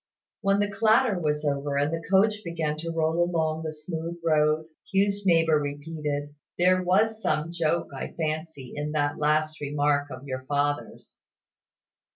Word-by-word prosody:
When 195 Hz, 0 st, +3 dB
the 205 Hz, 0 st, 0 dB
clatter 220 Hz, 0 st, +3 dB
was 150 Hz, -2 st, -1 dB
over, 140 Hz, 0 st, -1 dB
and 145 Hz, +3 st, +1 dB
the 165 Hz, -, -2 dB
coach 210 Hz, +2 st, +3 dB
began 160 Hz, -3 st, -2 dB
to 165 Hz, +2 st, -4 dB
roll 165 Hz, +1 st, +1 dB
along 160 Hz, -2 st, 0 dB
the 160 Hz, -1 st, -3 dB
smooth 160 Hz, +2 st, -5 dB
road, 155 Hz, 0 st, +3 dB, 0.3 s
Hugh's 200 Hz, 0 st, +1 dB
neighbour 165 Hz, -3 st, +4 dB
repeated, 145 Hz, 0 st, -4 dB, 0.2 s
"There 185 Hz, +1 st, +4 dB
was 215 Hz, +5 st, +2 dB
some 155 Hz, -1 st, 0 dB
joke, 170 Hz, 0 st, 0 dB
I 135 Hz, -, -5 dB
fancy, 155 Hz, -4 st, -4 dB
in 150 Hz, +1 st, -3 dB
that 145 Hz, -1 st, 0 dB
last 155 Hz, +1 st, +1 dB
remark 145 Hz, 0 st, +1 dB
of 130 Hz, 0 st, -9 dB
your 130 Hz, -2 st, -4 dB
father's." 145 Hz, +1 st, -2 dB
155 Hz, 155 wpm, -26 LUFS, 150-175 Hz, 0.3 s, neighbour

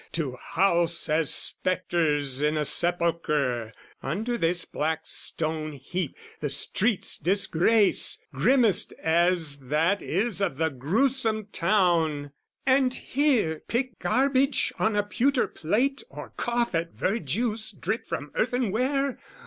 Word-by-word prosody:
"To 145 Hz, -6 st, -2 dB
house 170 Hz, +3 st, 0 dB
as 155 Hz, -1 st, +2 dB
spectres 150 Hz, -7 st, 0 dB
in 150 Hz, +1 st, +1 dB
a 150 Hz, -, 0 dB
sepulchre 150 Hz, -9 st, +1 dB, 0.3 s
"Under 220 Hz, -, -3 dB
this 175 Hz, -4 st, +1 dB
black 160 Hz, +1 st, -2 dB
stone 155 Hz, -1 st, -1 dB
heap, 165 Hz, +2 st, -5 dB, 0.2 s
the 145 Hz, -, -3 dB
street's 190 Hz, -, 0 dB
disgrace, 200 Hz, +2 st, +3 dB
"Grimmest 245 Hz, -8 st, +2 dB
as 165 Hz, -3 st, +2 dB
that 155 Hz, +9 st, 0 dB
is 200 Hz, +3 st, 0 dB
of 180 Hz, -9 st, -1 dB
the 160 Hz, +1 st, +1 dB
gruesome 215 Hz, -, 0 dB
town, 165 Hz, -6 st, +1 dB, 0.3 s
"And 260 Hz, -1 st, +3 dB
here 250 Hz, -, 0 dB
pick 245 Hz, -3 st, -2 dB
garbage 270 Hz, +8 st, +1 dB
on 220 Hz, -1 st, +1 dB
a 205 Hz, -, +2 dB
pewter 250 Hz, +5 st, +1 dB
plate 245 Hz, -, -1 dB
"Or -, -, -10 dB
cough 240 Hz, -2 st, -1 dB
at 165 Hz, 0 st, -2 dB
verjuice 215 Hz, -, -2 dB
dripped 200 Hz, +4 st, -4 dB
from 145 Hz, +1 st, -5 dB
earthenware? 250 Hz, +4 st, -1 dB
180 Hz, 115 wpm, -26 LUFS, 155-230 Hz, 0.3 s, disgrace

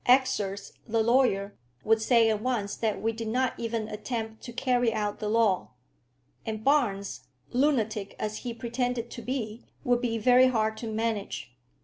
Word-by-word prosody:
Exors, 215 Hz, -6 st, +2 dB, 0.2 s
the 225 Hz, 0 st, +2 dB
lawyer, 220 Hz, -5 st, +2 dB, 0.3 s
would 225 Hz, 0 st, +3 dB
say 230 Hz, 0 st, +5 dB
at 215 Hz, -1 st, -1 dB
once 220 Hz, -5 st, -1 dB
that 220 Hz, -2 st, -1 dB
we 225 Hz, -, 0 dB
did 225 Hz, 0 st, -5 dB
not 255 Hz, +2 st, +1 dB
even 230 Hz, -2 st, -2 dB
attempt 220 Hz, +1 st, -4 dB
to 240 Hz, -, -8 dB
carry 245 Hz, -1 st, +1 dB
out 210 Hz, -2 st, -2 dB
the 210 Hz, -, -2 dB
law; 215 Hz, -4 st, +2 dB, 0.7 s
and 220 Hz, -1 st, -4 dB
Barnes, 200 Hz, -, +1 dB, 0.3 s
lunatic 225 Hz, -7 st, +1 dB
as 215 Hz, 0 st, -3 dB
he 245 Hz, -, -5 dB
pretended 240 Hz, 0 st, -2 dB
to 235 Hz, -, -7 dB
be, 235 Hz, -3 st, -4 dB, 0.2 s
would 245 Hz, -1 st, +2 dB
be 230 Hz, -2 st, 0 dB
very 250 Hz, +3 st, +6 dB
hard 220 Hz, -3 st, +1 dB
to 230 Hz, -, -5 dB
manage. 215 Hz, -, -2 dB
225 Hz, 160 wpm, -28 LUFS, 215-245 Hz, 0.7 s, very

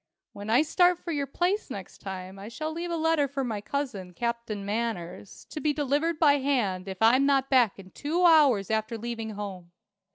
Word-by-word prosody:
When 205 Hz, +1 st, -8 dB
I 245 Hz, +7 st, +5 dB
start 355 Hz, +3 st, +3 dB
for 345 Hz, 0 st, -6 dB
your 285 Hz, -3 st, -1 dB
place 360 Hz, +8 st, -1 dB
next 195 Hz, -7 st, -8 dB
time, 190 Hz, 0 st, -7 dB
I 200 Hz, -, -8 dB
shall 310 Hz, +7 st, -4 dB
leave 340 Hz, +2 st, -4 dB
a 340 Hz, -, -1 dB
letter 320 Hz, -3 st, +2 dB
for 275 Hz, 0 st, -3 dB
my 220 Hz, -5 st, -3 dB
cousin, 205 Hz, -9 st, -4 dB
Captain 235 Hz, -2 st, -3 dB
Manners, 205 Hz, -4 st, -4 dB
to 305 Hz, -, -5 dB
be 300 Hz, -1 st, +1 dB
delivered 295 Hz, +3 st, 0 dB
by 290 Hz, -3 st, +4 dB
hand 215 Hz, -10 st, 0 dB
if 190 Hz, -1 st, -5 dB
I'm 255 Hz, +5 st, +5 dB
not 270 Hz, -1 st, +2 dB
back 245 Hz, -6 st, +4 dB
in 190 Hz, -1 st, -13 dB
two 335 Hz, +5 st, 0 dB
hours 280 Hz, -, +5 dB
after 220 Hz, +1 st, -1 dB
leaving 225 Hz, -1 st, -5 dB
home. 190 Hz, -4 st, -7 dB
245 Hz, 195 wpm, -27 LUFS, 205-295 Hz, -, I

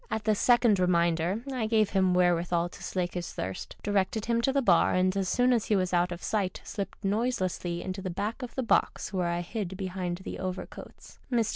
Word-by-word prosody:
'' -, -, -31 dB
At 220 Hz, -, -2 dB
this 215 Hz, -1 st, +1 dB
second 240 Hz, -5 st, +4 dB
reminder 175 Hz, +3 st, +1 dB
I 235 Hz, -4 st, -1 dB
gave 215 Hz, -2 st, +2 dB
him 185 Hz, -2 st, +3 dB
wherewithal 175 Hz, -1 st, +2 dB
to -, -, -13 dB
slake 180 Hz, -2 st, -2 dB
his 175 Hz, -1 st, -4 dB
thirst, 95 Hz, +1 st, -5 dB
directed 205 Hz, +1 st, 0 dB
him 235 Hz, 0 st, +1 dB
to 270 Hz, -, +2 dB
the 275 Hz, 0 st, +1 dB
bar, 180 Hz, -5 st, +4 dB
and, 185 Hz, +1 st, +2 dB
as 195 Hz, -2 st, 0 dB
soon 250 Hz, +5 st, +3 dB
as 230 Hz, -3 st, +1 dB
he 215 Hz, -, +2 dB
was 185 Hz, -2 st, 0 dB
out 175 Hz, 0 st, +2 dB
of 175 Hz, 0 st, -6 dB
sight, 200 Hz, -4 st, -1 dB
slipped 200 Hz, -1 st, -6 dB
noiselessly 190 Hz, -5 st, -1 dB
into 190 Hz, +1 st, -4 dB
the 185 Hz, -, -4 dB
back 210 Hz, +8 st, -3 dB
of 250 Hz, -, -7 dB
the 260 Hz, -, -1 dB
box, 230 Hz, -, +1 dB
where 180 Hz, -2 st, 0 dB
I 170 Hz, 0 st, -1 dB
hid 195 Hz, +1 st, -4 dB
beiiind 185 Hz, -2 st, -4 dB
the -, -, -6 dB
overcoats. 185 Hz, -1 st, -7 dB
Mr. 230 Hz, -3 st, +2 dB
190 Hz, 220 wpm, -28 LUFS, 180-220 Hz, -, second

